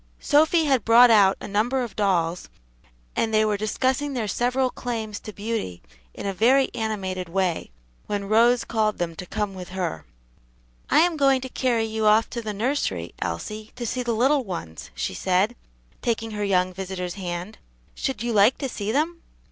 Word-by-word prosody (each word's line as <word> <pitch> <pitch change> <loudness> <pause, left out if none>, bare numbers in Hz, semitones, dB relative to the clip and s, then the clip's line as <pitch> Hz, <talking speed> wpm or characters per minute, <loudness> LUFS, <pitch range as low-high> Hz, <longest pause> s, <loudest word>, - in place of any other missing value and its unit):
Sophy 315 +2 +3
had 265 -6 +2
brought 235 +1 +7
out 200 -3 +5
a - - -7
number 235 +6 0
of 230 -5 -7
dolls, 180 -4 0 0.7
and 225 - 0
they 215 0 +3
were 210 -1 +1
discussing 260 +7 -1
their 235 -5 -2
several 250 +4 0
claims 220 -4 -4
to 215 - -9
beauty 205 - -4 0.3
in - - -7
a 195 - -1
very 255 +7 +3
animated 190 -5 -3
way 185 -2 -1 0.4
when 200 -1 -3
Rose 235 +3 +4
called 215 -2 0
to - - -23
them 170 -1 -3
to 180 - -8
come 205 +1 -2
with 185 -1 -8
her. 180 -3 -3 0.9
"I - - +5
am 340 -1 +2
going 275 -2 +4
to 260 - -6
carry 240 -3 0
you 220 -1 -1
off 215 +2 +4
to 235 - -4
the 215 -2 -4
nursery, 205 - -2
Elsie, 215 - -5
to 245 -1 -5
see 250 +3 -2
the 240 -1 -1
little 270 +4 +3
ones," 165 - -7
she - - -3
said, 185 - +1 0.5
taking 225 -1 -1
her 210 -1 -3
young 185 -2 +1
visitor's 180 -1 -5
hand; 180 +2 -6 0.3
"should 265 -5 -3
you 240 -1 -1
like 210 +4 +5
to 270 - -3
see 210 -2 -3
them?" 325 +6 0
215 Hz, 185 wpm, -24 LUFS, 190-245 Hz, 0.9 s, brought